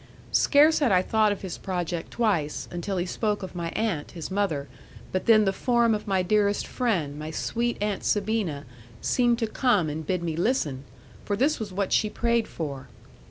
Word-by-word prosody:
Scarce 300 +2 +5
had 280 -7 +2
I 185 -1 +4
thought 215 0 +2
of 200 - -4
his 185 -3 -5
project 175 -3 -3
twice, 190 -11 0
until 180 +3 -3
he 175 - 0
spoke 210 +2 -1
of 190 - -7
my 170 -2 -3
aunt, 200 -10 -1
his 170 0 -6
mother, 185 -8 -1 0.4
but 185 - -2
then 215 -2 +6
the 195 - +1
form 235 +1 +2
of 215 0 -3
my 190 -2 +1
dearest 205 +1 +2
friend, 170 - -1
my 155 +1 -5
sweet 235 +9 -2
Aunt 210 -2 -1
Sabina, 200 -8 0 0.3
seemed 240 -2 +2
to 230 - 0
come 215 - +1
and 155 +2 -4
bid 180 +2 -2
me 165 -2 -2
listen, 155 - 0 0.4
for 205 - -1
this 275 +8 +1
was 215 -3 -5
what 195 +1 -1
she 215 - +3
prayed 235 0 0
for. 140 -5 -6
200 Hz, 190 wpm, -26 LUFS, 170-225 Hz, 0.4 s, then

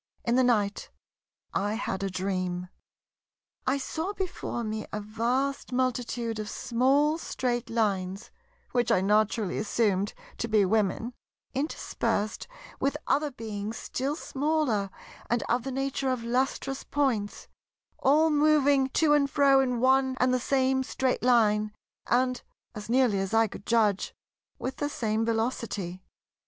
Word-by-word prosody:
In 235 - +2
the 260 - +4
night 210 -5 +1 0.6
I 205 +2 0
had 195 -4 -3
a 195 - -1
dream. 185 -1 -2 1.0
I 265 +2 +3
saw 320 +8 -3
before 370 -11 -4
me 215 0 -4
a 210 - -3
vast 240 +7 -1
multitude 245 -3 -1
of 210 -1 -4
small 275 +8 +2
Straight 245 -6 -2
Lines 200 -3 -1 0.4
(which 245 -2 +1
I 185 - +4
naturally 210 0 +1
assumed 205 -2 0 0.2
to 230 - -1
be 215 -3 +4
Women) 220 +4 0 0.4
interspersed 260 - -2 0.3
with 280 +2 0
other 295 +2 +1
Beings 220 -4 -5
still 275 +3 -2
smaller 280 - 0 0.4
and 235 0 +1
of 245 +1 +1
the 270 +3 -5
nature 270 0 -1
of 255 -3 -1
lustrous 265 +3 -1
points—all 275 +4 -1
moving 290 -3 +4
to 310 -2 +4
and 285 -1 +3
fro 275 -1 +5
in 250 -3 +1
one 260 +1 +3
and 255 0 +3
the 255 - +2
same 265 +1 +2
Straight 260 0 -1
Line, 215 -4 +3 0.3
and, 255 +1 +2 0.3
as 210 +1 -8
nearly 240 -5 +3
as 195 +3 -1
I 225 0 +5
could 205 - -9
judge, 215 -4 +2 0.4
with 260 0 -4
the 290 - -1
same 220 -4 -1
velocity. 225 -5 -2
240 Hz, 135 wpm, -28 LUFS, 210-270 Hz, 1.0 s, fro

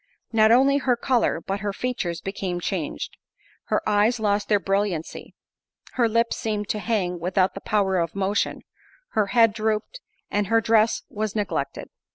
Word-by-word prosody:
Not 220 0 +5
only 270 +4 +5
her 255 -3 +2
colour, 245 -8 +1
but 195 +4 -4
her 205 0 -2
features 215 -9 -3
became 190 -2 -3
changed; 175 -3 -4 0.5
her - - -1
eyes 215 +3 +3
lost 205 -1 0
their 205 -1 +4
brilliancy, 195 -3 -2 0.6
her 235 -2 +2
lips 230 +1 +1
seemed 210 -2 -2
to 210 - -1
hang 190 -6 -1
without 185 +2 +1
the 195 - -8
power 195 -3 +1
of 170 +2 -2
motion, 200 +1 -1 0.5
her 215 -2 +1
head 225 0 +4
drooped, 220 - -2 0.3
and 205 -1 0
her 225 +1 +4
dress 225 0 +2
was 215 0 -3
neglected. 210 -2 -2
210 Hz, 160 wpm, -24 LUFS, 195-225 Hz, 0.6 s, Not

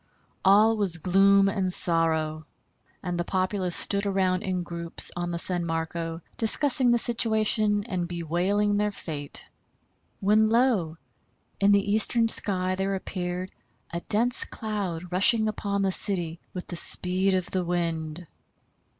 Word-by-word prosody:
All 215 +3 +4
was 195 -5 +1
gloom 195 +3 +3
and 195 -2 -2
sorrow, 160 -3 +3 0.6
and 175 -1 -4
the - - -1
populace 185 0 -1
stood 200 0 +1
around 190 -2 -1
in 185 -4 -3
groups 170 -1 -1
on 175 0 -4
the 170 - -4
San 175 0 -1
Marco 165 0 -5 0.2
discussing 255 +2 +4
the 240 - +3
situation 215 -3 +1
and 185 -6 -4
bewailing 180 +5 -1
their 210 0 0
fate, 150 -7 -8 0.7
when 215 +2 +2
lo! 220 -9 0 0.6
in 200 0 +3
the 200 0 +1
eastern 225 +2 +2
sky 185 -4 +1
there 195 +1 -3
appeared 185 -1 -6 0.4
a 170 - -3
dense 235 +4 +2
cloud 190 -6 -6
rushing 215 +4 +4
upon 200 -2 -3
the 190 - 0
city 175 -4 0
with 180 - -8
the 175 - -8
speed 185 +3 +1
of 185 -1 -4
the 185 -1 -2
wind. 170 -1 -4
185 Hz, 140 wpm, -25 LUFS, 175-205 Hz, 0.7 s, All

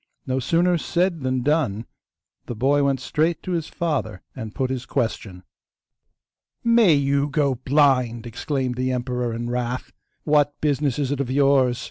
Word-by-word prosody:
No 130 0 -1
sooner 170 +6 +2
said 175 0 0
than 130 -1 -1
done; 135 -7 0 0.6
the 120 - -5
boy 140 +5 +2
went 135 -1 +1
straight 160 +6 -1
to 185 - -4
his 165 -3 -1
father 155 - -3
and 110 -4 -7
put 130 -1 -1
his 130 -1 -4
question. 100 -5 -3 1.2
'May 230 -8 +5
you 140 0 +1
go 140 -1 +1
blind!' 130 -3 +2
exclaimed 125 +1 -3
the 130 0 0
emperor 125 -1 -2
in 120 +1 -4
wrath; 125 +1 -3 0.3
'what 145 -1 +2
business 145 -3 0
is 140 -2 -1
it 145 - -2
of 135 -3 -2
yours? 135 -2 +3
135 Hz, 155 wpm, -23 LUFS, 125-150 Hz, 1.2 s, May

